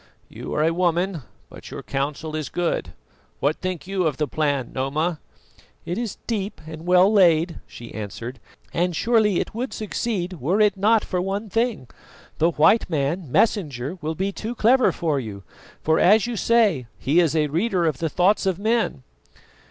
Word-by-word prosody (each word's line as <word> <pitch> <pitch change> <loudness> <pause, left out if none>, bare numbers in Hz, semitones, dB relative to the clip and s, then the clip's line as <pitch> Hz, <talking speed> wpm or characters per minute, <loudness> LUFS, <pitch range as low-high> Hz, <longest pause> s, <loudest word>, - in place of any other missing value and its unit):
"You - - -6
are 150 - +2
a 165 +1 +2
woman, 175 0 0 0.3
but - - -12
your - - -7
counsel 145 +3 -3
is 155 -2 -3
good. 170 - -2 0.5
What 145 +3 +1
think 185 -3 -4
you 190 -2 0
of 145 -4 -2
the 150 - 0
plan, 140 -3 -1
Noma?" 150 +5 -1 0.7
"It 175 - -2
is 235 -5 -4
deep 210 -3 -3
and 160 +2 -9
well 180 +3 +5
laid," 170 -4 +4
she 120 -1 -11
answered, 115 +4 -6 0.3
"and 175 0 0
surely 220 -2 +2
it - - -3
would 245 +4 -4
succeed 190 - -3
were 175 - +1
it 210 -2 +4
not 215 +3 +3
for 180 - -1
one 195 +3 -3
thing. 225 - 0 0.5
The 165 - +4
white 170 +8 +3
man, 155 0 -1
Messenger, 155 - 0
will 160 +1 -3
be 190 +4 -1
too 225 +4 -5
clever 250 +4 +4
for 155 -5 -1
you, 105 -6 -7 0.4
for 160 0 +3
as 210 +2 +5
you 240 -1 -3
say, 210 - +2
he 145 +8 +2
is 165 -3 +2
a 155 -1 +3
reader 175 +4 0
of 155 -5 0
the 165 - -1
thoughts 195 +5 +2
of 185 -3 +1
men." 220 - 0
175 Hz, 175 wpm, -23 LUFS, 150-205 Hz, 0.7 s, well